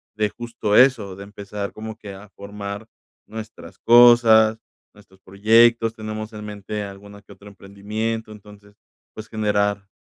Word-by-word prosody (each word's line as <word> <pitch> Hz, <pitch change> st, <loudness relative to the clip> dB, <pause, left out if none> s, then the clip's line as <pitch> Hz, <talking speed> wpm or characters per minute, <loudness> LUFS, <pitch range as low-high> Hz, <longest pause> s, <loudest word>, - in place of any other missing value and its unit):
de 105 Hz, -1 st, 0 dB
justo 115 Hz, -2 st, -3 dB
eso, 115 Hz, -7 st, +4 dB
de 100 Hz, -, -10 dB
empezar 100 Hz, 0 st, -7 dB
como 110 Hz, 0 st, -8 dB
que 105 Hz, -3 st, -10 dB
a 100 Hz, +2 st, -14 dB
formar 100 Hz, +1 st, -8 dB, 0.4 s
nuestras 110 Hz, -5 st, -10 dB
cosas, 115 Hz, -2 st, +6 dB, 0.4 s
nuestros 95 Hz, -2 st, -21 dB
proyectos, 115 Hz, +3 st, +3 dB
tenemos 110 Hz, 0 st, -7 dB
en 105 Hz, 0 st, -8 dB
mente 105 Hz, 0 st, -6 dB
alguno 100 Hz, +1 st, -11 dB
que -, -, -20 dB
otro 100 Hz, -, -15 dB
emprendimiento. 105 Hz, +3 st, -5 dB
Entonces, 105 Hz, -1 st, -15 dB, 0.4 s
pues, 110 Hz, 0 st, -10 dB
generar 105 Hz, -2 st, -1 dB
105 Hz, 140 wpm, -21 LUFS, 100-110 Hz, 0.4 s, cosas